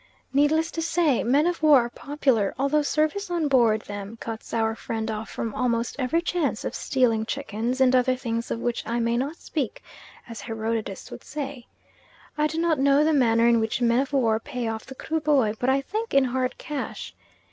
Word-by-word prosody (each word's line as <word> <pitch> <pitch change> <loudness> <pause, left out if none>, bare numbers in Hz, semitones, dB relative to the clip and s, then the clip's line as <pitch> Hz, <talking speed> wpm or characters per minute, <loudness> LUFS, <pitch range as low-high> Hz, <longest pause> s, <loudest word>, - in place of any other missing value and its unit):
Needless 315 +4 +3
to 330 - -3
say, 325 -5 +2
men 275 +6 +3
of 350 -1 -1
war 300 -4 +7
are 235 - -3
popular, 265 -9 0
although 280 +3 +2
service 310 +7 0
on 340 -3 0
board 235 -6 +3
them 205 +2 -7
cuts 225 -1 -7
our 225 -1 +1
friend 225 0 -4
off 215 +1 -5
from 225 -2 -4
almost 235 -1 -1
every 305 +6 +1
chance 310 -11 -1
of - - -3
stealing 235 -4 +1
chickens 240 0 -3
and 260 -1 +5
other 255 0 +3
things 230 -2 -3
of - - -2
which 240 0 -1
I 235 +1 -1
may 235 0 +1
not 275 +6 -1
speak, 290 -8 -4 0.4
as 230 -2 -8
Herodotus 225 -3 -4
would - - -9
say. 275 -4 -6 0.7
I 300 0 +2
do 315 - -5
not 330 -3 +1
know 280 +2 +4
the 315 +1 +3
manner 230 -4 +4
in 235 -1 +4
which 220 +1 -1
men 240 0 +3
of 275 +2 -1
war 230 -6 +2
pay 250 -2 -4
off 225 0 -4
the 265 - -9
Kruboy, 295 -8 +1
but 250 - +1
I 270 +1 +3
think 435 +8 -4
in 275 - +6
hard 255 0 -1
cash. 290 -3 -5
255 Hz, 200 wpm, -25 LUFS, 230-295 Hz, 0.7 s, war